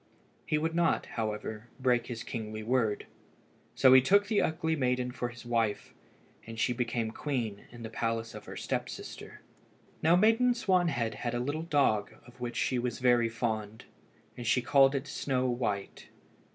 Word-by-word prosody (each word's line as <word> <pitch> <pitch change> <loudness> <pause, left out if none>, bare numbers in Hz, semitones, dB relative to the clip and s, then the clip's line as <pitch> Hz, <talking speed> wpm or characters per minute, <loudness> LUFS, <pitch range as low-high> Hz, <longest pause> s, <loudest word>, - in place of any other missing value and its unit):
He 155 - +2
would 160 +2 -1
not, 170 0 +2
however, 110 0 -4
break 125 -2 +2
his 115 -2 -5
kingly 110 -2 -5
word, 115 -3 0 0.7
so 130 -1 +6
he 130 - +9
took 200 +9 +4
the 205 0 +2
ugly 160 0 0
maiden 125 -3 0
for 120 -1 -3
his 120 0 -12
wife, 115 -3 -1 0.5
and 115 0 -8
she 120 +2 +1
became 115 -2 -2
queen 115 -7 -3
in 120 -1 -10
the 110 - -5
place 115 0 -2
of - - -9
her - - -8
step - - -2
sister. - - -9 0.6
Now 165 +2 +5
Maiden 225 +6 +4
Swanwhite 175 - +1
had 120 0 -2
a - - 0
little 145 +6 -2
dog 140 -10 +1
of 125 0 -17
which 120 -1 -4
she 130 - +1
was 120 -1 -2
very 120 -2 +3
fond, 110 -2 -3 0.5
and 120 -2 -6
she 120 +2 +3
called 135 +1 +5
it 135 +1 -2
Snow 130 -2 -1
white. 115 -5 -3
125 Hz, 170 wpm, -30 LUFS, 115-145 Hz, 0.7 s, he